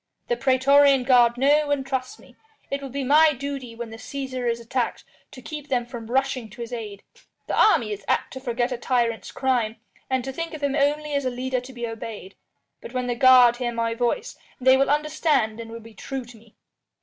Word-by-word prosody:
The 485 - +2
praetorian 275 - +4
guard 245 -2 +4
know 290 +3 +3
and 285 -2 0
trust 260 -1 -3
me. - - -19 0.4
It 275 0 -2
will 275 - -6
be 275 +2 -3
my 300 +4 +5
duty 270 -3 -6
when 230 -1 -7
the 225 - -8
Cæsar 260 -1 -4
is 235 0 -1
attacked 235 +1 -2 0.3
to 255 - -13
keep 300 0 -7
them 245 -3 0
from 235 -2 -9
rushing 260 -2 0
to 240 +4 -11
his 235 +1 -6
aid. 210 -4 -6 0.4
The - - -4
army 235 - +4
is 200 -1 -8
apt - - 0
to 260 - -6
forget 245 -1 -1
a 250 - -3
tyrant's 235 -2 -1
crime, 245 -5 0 0.3
and 260 -1 0
to 265 +1 -5
think 330 +2 -5
of 300 - -9
him 280 -1 0
only 295 +1 0
as 280 0 0
a - - +2
leader 255 0 -2
to 250 +2 -11
be 240 -2 -5
obeyed. 225 -4 -7 0.5
But - - -10
when 255 -1 -1
the 245 - -1
guard 250 -1 +6
hear 245 -1 -2
my 230 0 -1
voice, 245 - -2 0.2
they 260 +1 +5
will 275 +1 +2
understand 295 -6 +1
and 230 -1 -7
will 230 - -7
be 225 0 -14
true 265 +4 -6
to 240 0 -14
me." 225 -1 -20
255 Hz, 220 wpm, -24 LUFS, 235-275 Hz, 0.5 s, guard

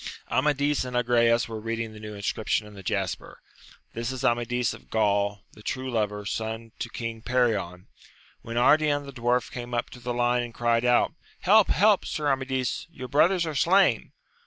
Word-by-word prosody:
Amadis 145 +1 +1
and 125 -1 -3
Agrayes 120 -1 +3
were 110 -1 -6
reading 115 0 -4
the 105 - -11
new 105 0 -8
inscrip 100 +2 -4
tion 105 - +1
in 105 - -12
the 100 - -10
jasper, 95 -2 -3 0.5
This 115 +2 -3
is 130 -1 -4
Amadis 120 0 +1
of - - -14
GranI, 100 -2 +1
the 105 - -15
true 130 +4 -4
lover, 105 -3 -1
son 110 +2 -4
to 120 - -4
King 115 -1 -5
Perion, 110 -8 0 0.3
— - - -30
^when 115 - -6
Ardian 145 +3 +3
the 140 - -9
dwarf 120 0 0
came 120 -1 -5
up 120 - -2
to 125 - -11
the 120 0 -4
line, 120 0 +1
and 120 -1 -7
cried 120 0 +1
out, 125 +5 +3 0.3
Help! 210 +2 +5
help, 210 0 +4
Sir 150 -3 -1
Amadis, 130 -1 -2
your 130 -6 -9
brothers 170 +6 +3
are 160 - -3
slain 185 +7 +3
120 Hz, 185 wpm, -26 LUFS, 110-130 Hz, 0.5 s, Help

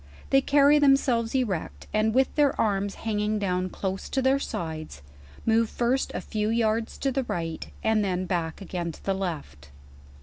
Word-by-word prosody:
They 270 - +6
carry 285 +2 +5
themselves 270 -4 +3
erect, 215 -10 -2
and 215 +1 +2
with 260 +3 +2
their 290 -2 +2
arms 200 -2 0
hanging 210 -1 0
down 185 -2 -1
close 190 +1 -4
to 270 - 0
their 265 +1 +3
sides, 155 - -5 0.4
mo/e 225 0 +3
first 245 +4 0
a - - -2
few 215 -1 -2
yards 225 0 0
to 270 - 0
the 265 0 -1
right, 165 -6 -4 0.2
and 220 -1 +2
then 185 -1 -1
back 170 -1 -2
again 175 -3 -4
to - - -15
the 195 - +1
left. 160 - -5
215 Hz, 170 wpm, -26 LUFS, 185-255 Hz, 0.4 s, They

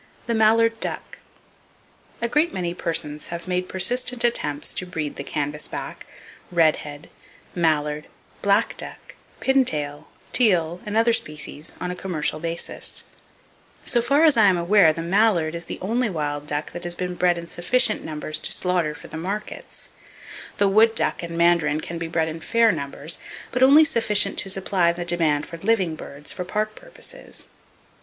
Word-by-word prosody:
The 235 - -1
Mallard 225 +1 +3
Duck.—A 235 - -8
great 300 +7 +2
many 175 -2 -3
persons 160 -4 -2
have 170 +1 -7
made 180 0 -1
persistent 245 +5 +1
attempts 150 -11 0
to 185 - -3
breed 155 -5 -4
the - - -5
canvasback, 145 +1 -4 0.4
redhead, 155 -3 +1 0.5
mallard, 150 -3 0 0.3
black 200 +3 +2
duck, - - -10 0.3
pintail, 155 - 0 0.3
teal 180 -7 +2
and 210 +1 -1
other 230 +1 +4
species, 150 -4 -4
on 180 - -3
a - - -5
commercial 160 -5 -2
basis. 165 +1 -2 0.8
So 240 - +2
far 280 +6 +3
as 310 -6 +5
I 220 - +6
am 190 -3 +4
aware 170 -1 +5
the 165 +1 -5
mallard 175 -3 +2
is 170 0 -6
the - - -5
only 230 +4 0
wild 145 -4 -3
duck 150 +1 -3
that 175 - -7
has 175 0 -3
been 180 0 -3
bred 175 -1 +2
in 170 0 -7
sufficient 215 +7 +2
numbers 155 0 -3
to - - -2
slaughter 175 -4 +1
for - - -11
the - - -8
markets. 200 +6 -6 0.7
The 200 - +3
wood 220 +3 +4
duck - - +2
and 170 -1 -6
mandarin 170 -3 +3
can 170 +1 -6
be 165 - -3
bred 165 -1 0
in 160 +1 -5
fair 230 +5 +3
numbers, 145 0 -2 0.3
but 250 - -2
only 280 +4 +8
sufficient 225 -9 +2
to 195 - 0
supply 190 -2 +1
the 175 0 -5
demand 160 -4 +2
for 170 - -9
living 195 -3 +1
birds, 145 -1 -7
for 180 - -5
park 215 +4 -2
purposes. - - -5
175 Hz, 165 wpm, -23 LUFS, 160-215 Hz, 0.8 s, only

